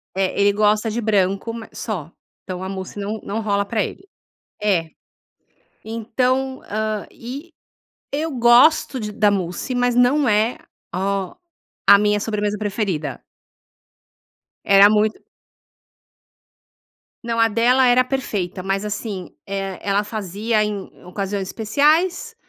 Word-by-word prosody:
É, 190 Hz, 0 st, 0 dB
ele 200 Hz, 0 st, +5 dB
gosta 215 Hz, +2 st, +2 dB
de 230 Hz, +2 st, -2 dB
branco, 200 Hz, 0 st, +1 dB
ma 230 Hz, -1 st, -8 dB
só, 175 Hz, -8 st, -5 dB, 0.3 s
então 185 Hz, -1 st, -6 dB
a 190 Hz, -, -4 dB
mousse 190 Hz, +1 st, -6 dB
não 210 Hz, +2 st, -3 dB
não 220 Hz, +3 st, -3 dB
rola 200 Hz, -2 st, 0 dB
pra 215 Hz, 0 st, 0 dB
ele. 385 Hz, -, -8 dB, 0.5 s
É. 185 Hz, -6 st, +1 dB, 1.0 s
Então, 255 Hz, +4 st, -1 dB
hã, 215 Hz, 0 st, -2 dB
e 275 Hz, +8 st, -9 dB, 0.6 s
eu 310 Hz, +3 st, -1 dB
gosto 250 Hz, +4 st, +5 dB
de 210 Hz, -1 st, -4 dB
da 210 Hz, -1 st, +3 dB
mousse, 190 Hz, +5 st, -2 dB
mas 245 Hz, 0 st, +1 dB
não 250 Hz, +3 st, +3 dB
é 215 Hz, +3 st, +2 dB, 0.4 s
ó 195 Hz, 0 st, -1 dB, 0.5 s
a 200 Hz, -, +9 dB
minha 210 Hz, 0 st, +2 dB
sobremesa 210 Hz, -1 st, -2 dB
preferida. 195 Hz, -, -3 dB, 1.4 s
Era 200 Hz, +1 st, +7 dB
muito 215 Hz, 0 st, +2 dB, 2.0 s
não, 230 Hz, 0 st, -2 dB
a 225 Hz, -, +5 dB
dela 245 Hz, +4 st, +3 dB
era 245 Hz, +1 st, +5 dB
perfeita, 205 Hz, -9 st, -3 dB
mas 195 Hz, +2 st, -2 dB
assim, 210 Hz, -3 st, -5 dB
eh, 195 Hz, -1 st, -4 dB
ela 200 Hz, +1 st, +1 dB
fazia 210 Hz, +1 st, -1 dB
em 205 Hz, -2 st, -4 dB
ocasiões 195 Hz, +1 st, -4 dB
especiais, 315 Hz, -, +1 dB
210 Hz, 125 wpm, -21 LUFS, 195-235 Hz, 2.0 s, a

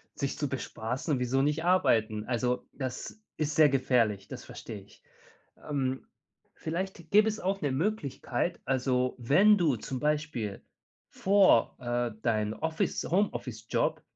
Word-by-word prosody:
sich 140 Hz, -1 st, -3 dB
zu 145 Hz, -, -1 dB
bespaßen, 130 Hz, +2 st, -3 dB
wieso 125 Hz, +2 st, +1 dB
nicht 150 Hz, +3 st, 0 dB
arbeiten? 110 Hz, -12 st, +2 dB
Also, 125 Hz, +1 st, -1 dB
das 130 Hz, -, -6 dB, 0.2 s
ist 155 Hz, -1 st, -1 dB
sehr 155 Hz, -1 st, +7 dB
gefährlich, 115 Hz, -7 st, +1 dB
das -, -, -8 dB
verstehe 105 Hz, -3 st, -8 dB
ich. 100 Hz, -, -21 dB, 0.7 s
Ähm, 130 Hz, -2 st, -1 dB, 0.5 s
vielleicht 170 Hz, 0 st, -5 dB
gäbe 210 Hz, +2 st, +6 dB
es 220 Hz, 0 st, -1 dB
auch 195 Hz, +1 st, -1 dB
'ne 145 Hz, -, 0 dB
Möglichkeit, 155 Hz, -, -2 dB
also 130 Hz, -1 st, +1 dB
wenn 190 Hz, -, +5 dB
du 160 Hz, -8 st, +2 dB
zum 130 Hz, +4 st, -5 dB
Beispiel 150 Hz, -8 st, -2 dB, 0.5 s
vor, 195 Hz, 0 st, +4 dB
äh, 120 Hz, -1 st, -1 dB
dein 110 Hz, -2 st, 0 dB
Office 160 Hz, +6 st, -2 dB
Homeoffice-Job 130 Hz, -, -1 dB
135 Hz, 130 wpm, -29 LUFS, 120-160 Hz, 0.7 s, sehr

